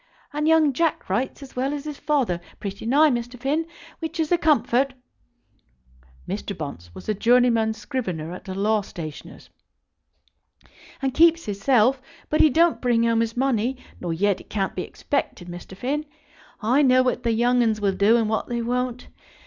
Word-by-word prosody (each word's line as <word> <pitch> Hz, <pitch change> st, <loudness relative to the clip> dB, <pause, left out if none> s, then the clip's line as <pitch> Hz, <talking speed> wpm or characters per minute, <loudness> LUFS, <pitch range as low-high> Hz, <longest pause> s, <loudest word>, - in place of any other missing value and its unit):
And 300 Hz, +1 st, 0 dB
young 320 Hz, -3 st, +4 dB
Jack 325 Hz, -, -1 dB
writes 255 Hz, +7 st, -1 dB
as 270 Hz, -, -13 dB
well 265 Hz, +3 st, -1 dB
as 285 Hz, -, -6 dB
his 300 Hz, -2 st, -6 dB
father, 250 Hz, -, 0 dB, 0.2 s
pretty 200 Hz, +2 st, -6 dB
nigh, 295 Hz, +4 st, +5 dB
Mr. 240 Hz, 0 st, -4 dB
Finn, 295 Hz, +5 st, -1 dB, 0.3 s
which 325 Hz, 0 st, -5 dB
is 315 Hz, 0 st, 0 dB
a 350 Hz, -, +5 dB
comfort," 275 Hz, -3 st, +2 dB, 1.3 s
Mr. -, -, -4 dB
Bunce 85 Hz, +2 st, -7 dB
was -, -, -10 dB
a 215 Hz, -, +1 dB
journeyman 230 Hz, 0 st, +3 dB
scrivener 180 Hz, -, -4 dB
at 180 Hz, -, -10 dB
a 190 Hz, -, -5 dB
law 210 Hz, +2 st, +2 dB
stationer's, 160 Hz, -6 st, -9 dB, 1.5 s
"and 265 Hz, -1 st, 0 dB
keeps 335 Hz, +1 st, +4 dB
his 200 Hz, -1 st, -5 dB
self; 255 Hz, +1 st, +3 dB, 0.3 s
but 305 Hz, -, +4 dB
he 310 Hz, -, +7 dB
don't 330 Hz, +4 st, +3 dB
bring 240 Hz, -2 st, +2 dB
home 230 Hz, -1 st, +2 dB
his 230 Hz, +1 st, -1 dB
money, 255 Hz, -1 st, +1 dB, 0.2 s
nor 175 Hz, -, -3 dB
yet 195 Hz, +4 st, +1 dB
it -, -, -20 dB
can't 195 Hz, -3 st, -1 dB
be 185 Hz, -, -3 dB
expected, 195 Hz, -9 st, -3 dB
Mr. 175 Hz, +2 st, -9 dB
Finn. 295 Hz, +7 st, -2 dB, 0.6 s
I 250 Hz, +7 st, +3 dB
know 255 Hz, -2 st, +5 dB
what 250 Hz, -1 st, 0 dB
the 235 Hz, -, 0 dB
young 245 Hz, +2 st, +3 dB
'uns 220 Hz, -2 st, +1 dB
will 200 Hz, -2 st, +1 dB
do, 205 Hz, +5 st, +4 dB
and 225 Hz, -2 st, +1 dB
what 220 Hz, 0 st, -1 dB
they 235 Hz, -1 st, -2 dB
won't. 250 Hz, +1 st, -2 dB
245 Hz, 180 wpm, -24 LUFS, 210-275 Hz, 1.5 s, he